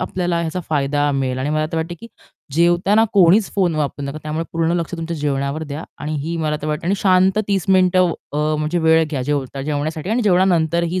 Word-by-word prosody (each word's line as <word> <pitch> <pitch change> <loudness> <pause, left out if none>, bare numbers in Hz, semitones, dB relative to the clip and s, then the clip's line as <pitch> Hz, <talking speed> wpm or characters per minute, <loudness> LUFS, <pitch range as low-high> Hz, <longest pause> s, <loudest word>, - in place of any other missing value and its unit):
आपल्याला 175 -2 -1
ह्याचा 170 +2 -3
फायदा 145 -1 +1
मिळेल 130 -2 -1
आणि 135 +3 -2
मला 155 0 0
तर 165 - -2
वाटतं 165 +2 -3
की 230 - -9 0.5
जेवताना 175 +6 +3
कोणीच 195 +2 +4
फोन 180 -5 +1
वापरू 145 -1 -2
नका. 140 +2 -5
त्यामुळे 155 +2 -3
पूर्ण 165 0 0
लक्ष 170 +1 -4
तुमच्या 165 0 -4
जेवणावर 145 +1 -2
द्या 145 +2 -6
आणि 150 +1 -4
ही 170 +1 -3
मला 155 -2 -1
तर - - -3
वाटते. 150 +2 -3
आणि 195 - +2
शांत 190 +1 +3
30 195 -4 0
मिनिटं 185 -1 +4
व - - -1 0.2
अ, 150 +1 +1
म्हणजे 155 +3 -1
वेळ 160 0 +4
घ्या 135 -4 -2
जेव 145 +1 -1
जेवण्यासाठी 150 +5 -3
आणि 240 +2 +1
जेवणानंतर 175 -4 +2
ही 185 - -1
160 Hz, 215 wpm, -19 LUFS, 150-180 Hz, 0.5 s, कोणीच